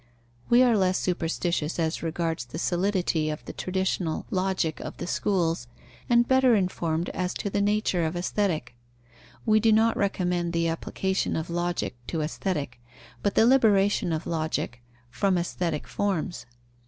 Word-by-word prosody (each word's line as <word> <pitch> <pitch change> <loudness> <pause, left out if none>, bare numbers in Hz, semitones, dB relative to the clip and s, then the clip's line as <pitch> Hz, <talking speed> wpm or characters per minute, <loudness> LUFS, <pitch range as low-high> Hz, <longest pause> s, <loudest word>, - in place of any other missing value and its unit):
We 240 +1 +6
are 240 -3 +4
less 185 -2 +2
superstitious 170 -2 -1
as 160 -1 -1
regards 165 -4 -2
the 120 - -8
solidity 175 -4 0
of 150 - -5
the - - -7
traditional 185 -3 -1
Logic 185 -4 0
of - - -7
the - - -4
schools, 170 -8 0 0.4
and 240 0 +4
better 260 -2 +5
informed 175 -4 -1
as 180 0 -2
to 200 - -3
the 200 - +1
nature 205 -4 +1
of 160 +2 -1
Aesthetic. 175 -8 -1 0.7
We 215 0 +5
do 225 +1 +4
not 220 +1 +4
recommend 180 -3 0
the 170 0 +1
application 190 +3 -1
of 160 +1 -3
Logic 175 -5 -1
to 165 - -2
Aesthetic, 150 -6 -3 0.4
but 205 - 0
the 220 - +6
liberation 205 -6 +4
of 160 0 -2
Logic 155 -7 -2 0.3
from 195 +3 +1
aesthetic 170 -2 -2
forms. 185 -7 -2
180 Hz, 150 wpm, -26 LUFS, 165-200 Hz, 0.7 s, We